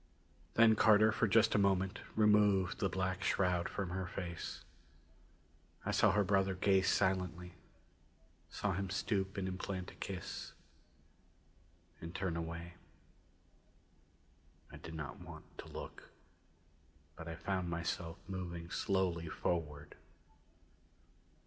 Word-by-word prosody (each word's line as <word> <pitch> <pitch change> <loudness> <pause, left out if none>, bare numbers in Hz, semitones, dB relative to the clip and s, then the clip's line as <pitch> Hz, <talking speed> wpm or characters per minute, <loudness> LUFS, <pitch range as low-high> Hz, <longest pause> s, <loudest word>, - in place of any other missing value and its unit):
Then 115 -1 +7
Carter 110 +1 +6
for 110 - +2
just 115 +2 +5
a - - +4
moment 95 -1 +2 0.2
removed 105 -3 +4
the 95 - +1
black 95 0 -1
shroud 90 -3 +1
from 95 -3 -3
her 95 0 -2
face. 85 -2 -5 1.2
I - - 0
saw - - +5
her 105 - +4
brother 95 0 +2
gaze 95 +1 +3
silently; 90 -2 0 1.0
saw 105 -2 -1
him 95 +1 -2
stoop 95 0 -1
and 95 -1 -1
implant 95 0 -4
a - - -15
kiss 95 -2 -6 1.5
and 85 +1 -7
turn 95 -2 -1
away. 85 +1 -5 2.0
I - - -9
did 80 - -9
not 75 -5 -6
want - - -10
to - - -7
look, - - -8 1.1
but 85 - -8
I 85 - -4
found 90 +1 -2
myself 85 0 -3
moving 85 -3 -5
slowly 90 -4 0
forward. 75 -4 -2
95 Hz, 115 wpm, -36 LUFS, 85-100 Hz, 2.0 s, Then